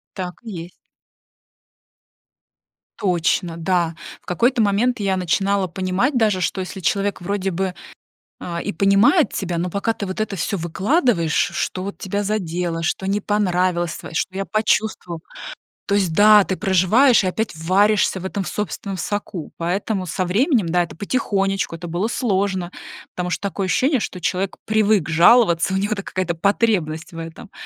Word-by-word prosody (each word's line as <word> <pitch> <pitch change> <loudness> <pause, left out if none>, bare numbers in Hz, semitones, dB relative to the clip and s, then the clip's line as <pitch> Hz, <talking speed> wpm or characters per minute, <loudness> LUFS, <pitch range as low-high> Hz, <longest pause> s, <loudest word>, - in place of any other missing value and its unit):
Так 180 -2 -5
и 225 - -7
есть. 175 -1 -7 2.3
Точно, 175 -2 0
да. 170 -1 0 0.3
В - - -33
какой-то 235 +7 +2
момент 220 +4 +2
я 195 -2 0
начинала 195 +2 +1
понимать 185 - -1
даже, 210 -5 +2
что 190 - -1
если 185 +1 -6
человек 200 +3 0
вроде 195 +1 -2
бы, 185 +1 -2 0.7
а, 170 -1 -4
и - - -3
понимает 200 - +4
тебя, 175 -3 -2
но 175 +2 -1
пока 200 +5 0
ты 205 - -5
вот 185 +2 -5
это 215 -2 -2
всё 195 +4 -1
выкладываешь, 190 - +1
ш - - +1
что 185 +1 -2
вот 200 - -6
тебя 200 +1 -2
задело, 175 -5 -2
что 175 +3 -2
не 200 +2 0
понравилось 180 -5 0
твоё, - - -10
что 185 - -1
я 195 - -1
почувствовала. 215 -5 -1 0.7
То 200 - +1
есть, 190 -5 +1
да, 210 +2 +7
ты 190 - -2
проживаешь 200 +6 +4
и - - +1
опять 220 +4 -2
варишься 190 +3 +2
в - - -7
этом 190 0 -3
собственном 200 0 -4
соку. 185 -2 -4
Поэтому 185 +3 -2
со 180 +2 -2
временем, 215 - +2
да, 175 +1 +2
это 170 - -9
потихонечку, 195 - -1
это 170 +1 -7
было 175 +6 -1
сложно, 195 -6 -1 0.4
потому 180 0 -3
что 175 - -2
такое 195 0 -3
ощущение, 260 +8 +2
что 185 -4 -5
человек 185 +2 -1
привык 215 -5 +2
жаловаться, 175 +1 +5
у - - +1
него 200 +2 -1
это 205 -2 -1
какая-то 185 -3 -2
потребность 180 -4 0
в 165 - -11
этом. 165 +6 -9
190 Hz, 165 wpm, -21 LUFS, 175-210 Hz, 2.3 s, да